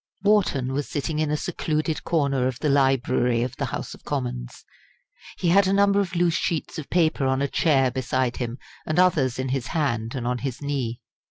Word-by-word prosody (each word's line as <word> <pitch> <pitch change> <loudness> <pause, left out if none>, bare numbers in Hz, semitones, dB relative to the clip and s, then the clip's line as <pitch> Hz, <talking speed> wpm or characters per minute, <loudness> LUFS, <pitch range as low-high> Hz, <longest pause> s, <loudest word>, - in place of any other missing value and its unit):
Wharton 180 -11 +2
was 145 +1 -2
sitting 150 +2 -2
in 155 -1 +1
a 150 - +1
secluded 155 -1 -2
corner 140 -6 +1
of 130 -2 -3
the 150 - -1
library 130 -3 +2
of 125 +1 -4
the - - -1
House - - -5
of - - -15
Commons. - - -4 0.7
He 175 - 0
had 195 +2 +5
a 190 - +2
number 200 0 +4
of 185 -3 -2
loose 175 -1 +2
sheets 160 -1 -2
of 150 - -8
paper 160 -5 +2
on 130 0 +1
a 140 - +1
chair 135 -4 +2
beside 130 -1 -1
him, 120 -1 -4 0.3
and 155 - -1
others 155 -9 +3
in 130 0 -2
his 130 -3 -2
hand 120 -6 -1
and 125 -3 -3
on 125 0 -1
his 135 -2 -4
knee. 135 -5 -3
140 Hz, 200 wpm, -24 LUFS, 125-160 Hz, 0.7 s, had